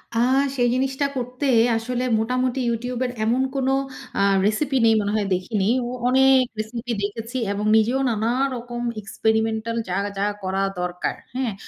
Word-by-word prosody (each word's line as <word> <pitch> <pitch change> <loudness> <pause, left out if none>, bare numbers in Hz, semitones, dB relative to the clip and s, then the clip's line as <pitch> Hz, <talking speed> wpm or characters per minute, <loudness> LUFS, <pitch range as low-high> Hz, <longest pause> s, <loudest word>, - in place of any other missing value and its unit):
আ - - +2 0.4
সেই 245 -1 +2
জিনিসটা 265 +2 0
করতে 250 +3 -3 0.3
আসলে 245 +2 -2 0.2
মোটামুটি 255 +3 0
YouTube 240 +2 -3
এর 250 - -2
এমন 235 +4 +2
কোন 265 -1 0 0.5
আ - - +3 0.2
রেসিপি 270 +7 0
নেই 225 - +6
মনে 205 0 -1
হয় 210 -2 +1
দেখিনি। 190 +2 -2 0.2
ও - - -4 0.2
অনেক 265 +1 +5 0.2
রেসিপি 230 +3 -4
দেখেছি 225 +5 -4
এবং 205 +1 -2
নিজেও 235 +5 +2
নানা 220 0 0 0.3
রকম 240 0 -6 0.2
experimental 220 +2 -1
যা, 180 - -2 0.2
যা 195 - 0 0.2
করা 190 +1 -1 0.2
দরকার। 180 0 -2 0.2
হ্যাঁ? 255 -5 -1
230 Hz, 155 wpm, -23 LUFS, 215-255 Hz, 0.5 s, নেই